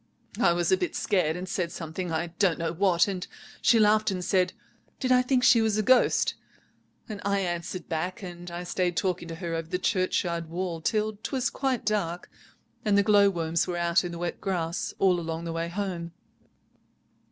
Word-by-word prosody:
I 180 -7 +4
was 175 -1 0
a 190 - +5
bit 180 - -3
scared 180 -6 +1
and 180 +1 -5
said 175 -2 -2
something—I 165 0 -4
don't 190 -5 +3
know 165 -1 -2
what—and 185 +1 +1 0.3
she 235 - +5
laughed 215 0 +4
and 185 -2 -3
said, 185 -1 +2 0.5
'Did 255 - 0
I 250 0 +6
think 250 0 +1
she 230 - +6
was 220 -1 +1
a 215 - +1
ghost?' 255 +3 +4 0.7
and 215 -4 -6
I 200 0 +1
answered 175 0 -4
back, 180 +5 -3
and 175 -1 -8
I 175 +1 -5
stayed 175 -1 -1
talking 180 -2 -1
to 165 - -6
her 170 -1 -4
over 165 0 -3
the 180 - 0
churchyard 180 -4 0
wall 170 -1 -3
till 215 +2 -1
'twas 255 +2 -1
quite 265 -3 -1
dark, 180 -5 -2 0.5
and 205 -1 +3
the 200 - +5
glowworms 195 -6 +3
were 175 -1 -2
out 170 +1 +2
in 175 - -4
the 170 - -6
wet 175 0 -4
grass 170 -3 -2
all 185 -2 +3
along 165 0 -4
the 165 -1 -4
way 165 +1 -2
home. 175 -3 -4
180 Hz, 185 wpm, -27 LUFS, 170-200 Hz, 0.7 s, I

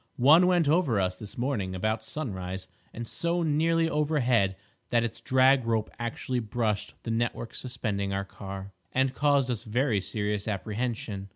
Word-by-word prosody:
One 155 +8 +6
went 175 -4 +3
over 145 - +3
us 90 -1 0
this 105 +2 -10
morning 115 -8 -1
about 110 +4 -1
sunrise, 95 -9 -5 0.2
and 115 0 -6
so 170 +5 -1
nearly 165 +2 +2
overhead 130 -11 +2 0.3
that 120 -1 +3
its 115 -1 -4
drag 130 0 +4
rope 115 -2 0
actually 125 +1 -2
brushed 110 -2 -1
the 115 - -3
network 115 0 -1
suspending 105 -6 -3
our 100 0 -1
car, 95 0 -8 0.2
and 130 0 +1
caused 140 -3 +2
us 115 - -2
very 115 -1 +1
serious 105 +1 -2
apprehension. 105 -1 -3
115 Hz, 155 wpm, -28 LUFS, 100-135 Hz, 0.3 s, One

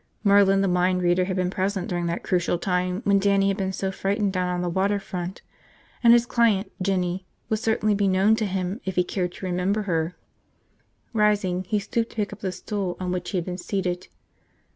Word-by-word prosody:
Merlin 200 -1 +5
the 195 - +2
mind 180 0 +2
reader 175 +1 +3
had 185 0 -2
been 180 -1 0
present 190 -1 -1
during 175 -1 -2
that 170 +1 -3
crucial 175 -1 +1
time 180 +1 -1
when 200 0 +4
Dannie 195 0 +3
had 195 - -1
been 190 -2 -1
so 190 0 -2
frightened 200 +1 -1
down 180 -1 0
on 180 0 -1
the - - -1
water 195 +4 +1
front. 185 -1 -6 0.6
And 235 - +8
his 235 0 +6
client, 225 -4 +2
Jinny, 185 -1 -1 0.2
would 220 - 0
certainly 220 -2 +1
be 200 0 +1
known 195 +3 +4
to 215 - 0
him 190 +3 -3
if 190 - -4
he 180 - +3
cared 180 0 -2
to - - -8
remember 185 +4 0
her. 170 -2 -1 1.0
Rising, 205 -4 +1
he 210 +4 0
stooped 225 +3 -1
to - - -16
pick 210 -2 -2
up 205 - -11
the 190 -3 -2
stool 185 0 -4
on 180 -1 -2
which 180 -1 -3
he 195 - -1
had 175 - -2
been 180 0 -5
seated. 180 -1 -2
190 Hz, 210 wpm, -25 LUFS, 180-200 Hz, 1.0 s, And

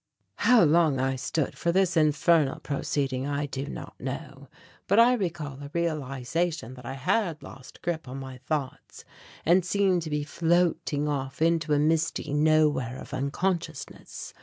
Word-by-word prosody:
How 245 -5 +5
long 155 -3 +4
I 135 0 0
stood 135 +3 -2
for 170 - 0
this 185 0 +2
infernal 155 -1 +3
proceeding 135 -2 -2
I 145 0 -1
do 140 0 -5
not - - -8
know. - - -6 0.4
But 200 - +3
I 240 +2 +7
recall 165 - -3
a 140 - -7
realization 155 -2 -2
that 125 -2 -11
I 135 - -4
had 165 - 0
lost 130 0 -13
grip 160 -4 -2
on 130 +2 -6
my 130 -1 -8
thoughts 135 0 -5 0.4
and 175 +3 +5
seemed 190 -1 +2
to 160 - -5
be 150 -1 -1
floating 165 -2 +1
off 135 -3 -3
into 165 -1 +2
a - - +4
misty 155 -1 0
nowhere 150 -5 +2
of - - -10
unconsciousness. 160 +2 -3
150 Hz, 155 wpm, -27 LUFS, 135-170 Hz, 0.4 s, I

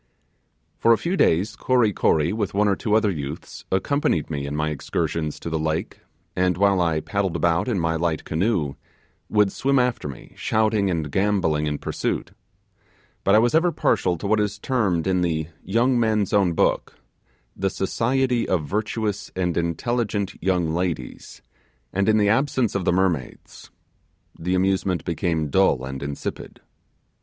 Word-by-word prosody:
For 115 - +5
a - - +3
few 175 +3 -2
days, 100 - +2
Kory 125 -5 +2
Kory, 80 +1 +2
with 105 -3 -2
one 105 +1 +3
or 100 - +3
two 105 +1 0
other 110 -2 +3
youths, 75 -2 -7
accompanied 95 - 0
me 70 -2 -3
in 70 - -4
my 75 +1 0
excursions 75 +1 -2
to - - -8
the 80 -1 -1
lake, 80 0 -2 0.4
and 90 -1 +1
while 100 -1 +3
I 80 -2 +1
paddled 100 -2 -2
about 85 +2 +1
in 115 -7 0
my 80 -1 0
light 80 -1 -1
canoe, 80 -4 0 0.6
would 105 -2 +3
swim 135 +2 +1
after 125 -9 +1
me 70 -4 -10
shouting 110 -2 +1
and 80 -5 -2
gambolling 95 -6 +1
in 75 -1 -1
pursuit. - - -3 0.9
But 100 - +4
I 110 - +5
as 120 - +2
ever 170 +2 +3
partial 95 - +1
to 80 - -8
what 110 +2 +2
is 105 0 -1
termed 105 -9 0
in 95 -1 +1
the 80 -2 -1
'Young 120 +5 +2
Men's 110 -3 +1
Own 95 -4 +3
Book' - - 0 0.6
'the 95 0 0
society 120 +5 0
of 85 -5 +1
virtuous 105 +2 -2
and 90 -2 -1
intelligent 100 +4 -1
young 90 -4 +1
ladies;' 85 -7 -4 0.5
and 100 +2 +1
in 110 - +4
the 105 -1 +3
absence 130 -1 +1
of 100 -3 -2
the - - +3
mermaids, 90 -7 -2 0.7
the 90 +3 -1
amusement 95 -2 0
became 80 -3 -1
dull 80 -9 +3
and 65 0 -6
insipid. 70 0 -6
95 Hz, 165 wpm, -23 LUFS, 80-110 Hz, 0.9 s, For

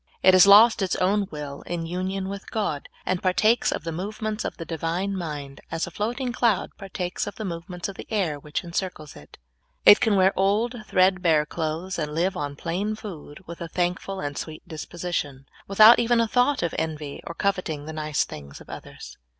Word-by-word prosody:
It 185 - +7
has 185 +1 +8
lost 215 +3 +8
its 190 -2 0
own 195 +2 +1
will 145 -2 -7
in 170 -1 -3
union 185 +3 -3
with 200 +1 -7
God, 200 -10 -2 0.2
and 185 -1 -1
partakes 215 +5 +3
of - - -3
the 165 - -3
movements 210 +5 -4
of - - -4
the 165 - -6
Divine 170 +5 -2
mind, 145 -6 -6
as 165 0 -2
a 170 - -9
floating 240 - -2
cloud 230 -6 +1
partakes 185 -2 -4
of 205 - -6
the 220 - -5
movements 175 0 -5
of 200 - -8
the - - -9
air 175 -9 0
which 150 +5 -4
encircles 170 -3 -4
it. 75 - -14 0.5
It 205 - +10
can 220 -4 +2
wear 190 0 +4
old. 205 +5 +2
thread 185 0 +3
bare 160 -4 +3
clothes, 165 +4 -3
and 150 -1 -3
live 180 +3 +1
on 145 -1 -4
plain 185 +8 -2
food, 180 -6 -9
with 170 +1 -9
a 170 - -4
thank 175 +2 0
ful 195 -1 -6
and 145 -3 -4
sweet 155 -1 -7
disposition, 155 -4 -4 0.2
Avithout 215 +4 +8
even 235 0 +3
a 230 - +3
thought 250 +1 +2
of 170 - -1
envy, 155 -3 -4
or 170 - -6
coveting 175 -7 -1
the 160 - -6
nice 155 -2 0
things 70 -1 -10
of - - -13
others. - - -10
180 Hz, 200 wpm, -25 LUFS, 160-200 Hz, 0.5 s, It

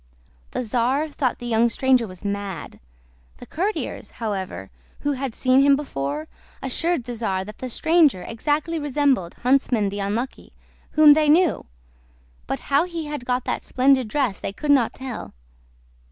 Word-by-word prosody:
The - - -3
czar 250 +7 0
thought 270 -4 -1
the 240 - -9
young 235 0 +3
stranger 255 -1 +2
was 185 +1 -11
mad; 200 -3 -4 0.6
the - - -11
courtiers, 395 +7 -3
however, 190 - -4 0.3
who 290 - 0
had 265 -3 -3
seen 255 +1 +4
him 280 0 +6
before, 150 - -4 0.3
assured 330 +3 0
the 245 +1 -6
czar 195 -5 -2
that 210 +1 -11
the 255 - -5
stranger 310 - +3
exactly 300 - -1
resembled 280 - +1
Huntsman 250 -5 +2
the 200 +1 -5
Unlucky, 215 +6 -3 0.4
whom 305 -1 +8
they 305 0 +2
knew; 335 +2 +3 0.8
but - - -3
how 285 +4 +2
he 340 -3 -5
had 295 -4 -5
got 250 0 -1
that - - -2
splendid 260 -1 +2
dress 245 -4 -1
they - - -4
could 290 +7 -1
not 260 -5 +3
tell. 260 -3 -7
255 Hz, 155 wpm, -23 LUFS, 215-290 Hz, 0.8 s, whom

